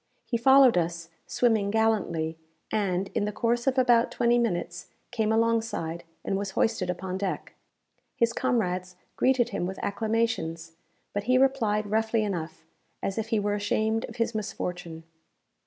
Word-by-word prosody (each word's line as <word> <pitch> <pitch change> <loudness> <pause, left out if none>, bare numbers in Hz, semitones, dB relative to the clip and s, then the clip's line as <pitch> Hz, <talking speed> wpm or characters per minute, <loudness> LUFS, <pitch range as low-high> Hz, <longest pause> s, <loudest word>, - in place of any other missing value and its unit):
He 240 - -2
followed 260 -2 +6
us, 170 0 -3 0.2
swimming 220 -5 +2
gallantly, 200 -7 +1 0.4
and, 195 -2 0
in 205 - 0
the 210 - -2
course 235 +3 0
of 265 0 +2
about 240 -2 +4
twenty 240 0 +2
minutes, 175 -6 -2 0.2
came 220 -3 0
alongside, 225 -7 0 0.2
and - - 0
was 200 -1 -3
hoisted 215 -5 +1
upon 185 +1 -3
deck. 195 -2 -3 0.6
His 235 0 +2
comrades 185 -9 -1 0.2
greeted 255 -2 +2
him 175 - -2
with 190 - -5
acclamations; 200 -7 -1 0.4
but 205 0 -2
he 255 +2 +4
replied 235 -6 +2
roughly 220 0 +1
enough, 170 -6 -4 0.4
as 195 +3 -2
if 220 - -3
he 225 -1 +1
were 205 0 0
ashamed 215 +2 0
of - - -11
his 230 0 -1
misfortune. 180 -5 -5
215 Hz, 150 wpm, -27 LUFS, 180-230 Hz, 0.6 s, followed